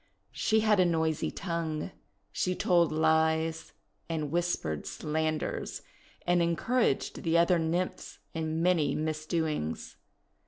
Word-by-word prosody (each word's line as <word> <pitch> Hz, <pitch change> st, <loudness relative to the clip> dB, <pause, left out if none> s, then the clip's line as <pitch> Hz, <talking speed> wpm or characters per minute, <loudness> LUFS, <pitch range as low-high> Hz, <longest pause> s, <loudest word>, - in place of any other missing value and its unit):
She 220 Hz, 0 st, +2 dB
had 215 Hz, -2 st, +3 dB
a -, -, +7 dB
noisy 160 Hz, -3 st, +1 dB
tongue. 165 Hz, -2 st, -3 dB, 0.4 s
She 180 Hz, 0 st, 0 dB
told 175 Hz, -3 st, +3 dB
lies 160 Hz, +1 st, +1 dB, 0.4 s
and 155 Hz, -3 st, -2 dB
whispered 170 Hz, -, -1 dB
slanders, 155 Hz, 0 st, -2 dB, 0.4 s
and 175 Hz, 0 st, +3 dB
en 170 Hz, 0 st, +2 dB
couraged 230 Hz, -, 0 dB
the 165 Hz, 0 st, +2 dB
other 170 Hz, +1 st, +4 dB
Nymphs 170 Hz, +3 st, -2 dB, 0.2 s
in 160 Hz, 0 st, -2 dB
many 165 Hz, -6 st, +2 dB
misdoings. 155 Hz, -, -2 dB
160 Hz, 115 wpm, -30 LUFS, 155-175 Hz, 0.4 s, a